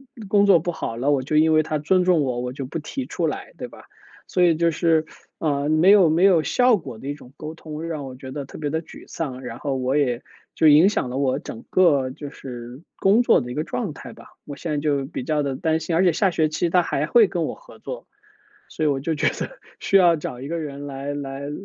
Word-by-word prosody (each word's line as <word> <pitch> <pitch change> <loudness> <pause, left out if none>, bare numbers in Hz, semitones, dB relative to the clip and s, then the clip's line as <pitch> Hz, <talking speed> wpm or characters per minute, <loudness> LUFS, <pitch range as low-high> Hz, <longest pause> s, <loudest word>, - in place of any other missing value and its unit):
嗯 220 -5 -10
工 205 0 +4
作 195 -4 +6
不 175 +3 -2
好 140 -8 -5
了， 130 +5 0
我 140 -2 +2
就 145 +4 -3
因 160 +1 +5
为 155 0 +4
他 155 0 -2
尊 180 +5 +2
重 180 -4 +4
我， 125 -3 -2
我 125 0 -4
就 135 0 -5
不 165 +6 -5
提 260 - -5
出 - - -2
来， - - -5
对 - - -6
吧？ - - -15 0.4
所 180 - -1
以 175 -2 +5
就 170 +1 +2
是， 160 0 +2 0.3
呃， 145 -2 0
没 155 +5 +5
有 195 -5 +6
没 165 +4 +2
有 185 -4 +5
效 250 +3 +3
果 130 - -9
的 130 - -9
一 - - -1
种 135 -3 -15
沟 155 +1 -7
通， 155 -1 -8
让 155 -4 -4
我 130 -1 -8
觉 130 0 -9
得 140 0 -5
特 - - -11
别 150 -2 -3
地 160 +2 -1
沮 160 - -13
丧。 135 -5 -5
然 120 -1 -7
后 140 -2 -2
我 130 +1 -1
也 125 -4 0 0.3
就 160 - +4
影 155 +6 +7
响 170 -11 -2
了 130 - -3
我 135 -1 +1
整 115 -5 -8
个 145 -8 +3
就 145 +2 -8
是 125 0 -9
工 200 +5 +4
作 245 - +4
的 125 - -6
一 - - -4
个 150 - -2
状 195 -1 -4
态 - - -10
吧。 - - -15 0.2
我 145 - -7
现 165 +3 -5
在 150 - 0
就 145 -2 0
比 135 -2 -6
较 150 +2 0
地 140 -2 -2
担 160 +1 0
心， 160 +1 -2
而 170 - +3
且 180 - +5
下 190 +4 +1
学 160 -2 +1
期 170 +3 -1
他 180 - +5
还 150 -3 -1
会 225 +5 +5
跟 175 -2 -2
我 - - -3
合 - - -16
作， - - -8 0.6
所 - - -5
以 155 - +3
我 140 -2 0
就 160 +4 -2
觉 150 - +1
得 - - -6 0.2
需 - - -1
要 175 -3 +6
找 125 -5 -6
一 135 - -6
个 170 +3 -3
人 145 -3 -6
来 140 +1 -5
来 135 -1 -6
来 140 +1 -5
155 Hz, 290 characters per minute, -23 LUFS, 135-170 Hz, 0.6 s, 影